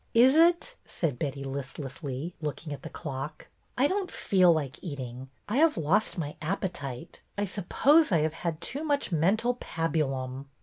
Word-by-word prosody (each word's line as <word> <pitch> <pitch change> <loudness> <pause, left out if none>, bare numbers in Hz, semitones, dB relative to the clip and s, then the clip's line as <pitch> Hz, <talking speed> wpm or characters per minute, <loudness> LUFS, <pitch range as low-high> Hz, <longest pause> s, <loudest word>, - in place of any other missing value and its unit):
''Is 250 +3 +7
it?" 345 +9 +4
said 145 -8 -2
Betty, 140 -2 -3
listlessly, 135 +2 -5
looking 150 0 -4
at 145 - -8
the - - -7
clock. 145 0 -6
" - - -40
I 260 - +4
don't 380 +1 -1
feel 185 -3 +4
like 145 -4 -1
eating. 130 -5 -6 0.2
I 215 - -1
have 320 +1 +4
lost 180 +8 +1
my 150 -3 -3
appetite. 160 -5 -4 0.2
I 205 - +1
suppose 260 - +3
I 165 -4 +4
have 155 0 0
had 165 -1 -3
too 280 - -1
much 285 -8 0
mental 195 +9 +2
pabulum 135 -5 -2
165 Hz, 165 wpm, -28 LUFS, 140-215 Hz, 0.2 s, Is